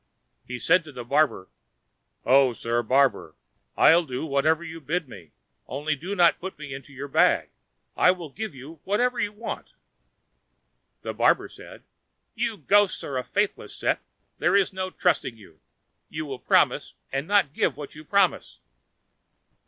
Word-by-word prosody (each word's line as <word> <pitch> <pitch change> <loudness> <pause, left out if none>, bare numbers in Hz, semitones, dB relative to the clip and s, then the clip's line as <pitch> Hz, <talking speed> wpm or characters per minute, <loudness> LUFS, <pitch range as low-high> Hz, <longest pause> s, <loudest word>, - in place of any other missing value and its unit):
He 125 - -5
said 180 +8 +3
to 150 - -10
the 125 -3 -7
barber, 140 -6 +1 0.8
"O, 130 -1 +5
sir 115 +1 -1
barber, 135 +4 +1 0.4
I'll 170 +2 +6
do 130 -1 -4
whatever 155 +3 +1
you 165 -1 -8
bid 160 +2 -2
me, 85 -11 -13 0.4
only 150 +3 -2
do 180 +8 -5
not 175 -3 +4
put 190 +1 -7
me 140 -3 -8
into 135 +1 -10
your 140 +1 -7
bag. 135 - +2 0.4
I'll 180 -3 +2
give 215 +2 -6
you 145 +5 -11
whatever 245 +6 0
you 205 - 0
want." 220 +2 -7 1.3
The - - -4
barber - - +3
said, - - -13 0.5
"You 220 - -2
ghosts 200 +5 +2
are 140 - -5
a - - -4
faithless 205 +7 -2
set, - - 0 0.4
there - - +2
is 195 -1 +3
no 185 0 -3
trusting 175 -11 0
you. 85 -7 -18 0.5
You 155 0 -5
will 135 -3 -6
promise, - - +2 0.2
and 135 +3 -2
not 200 -8 +3
give - - 0
what 145 -1 -8
you 150 - -11
promise." 195 +2 +1
155 Hz, 155 wpm, -25 LUFS, 135-185 Hz, 1.3 s, I'll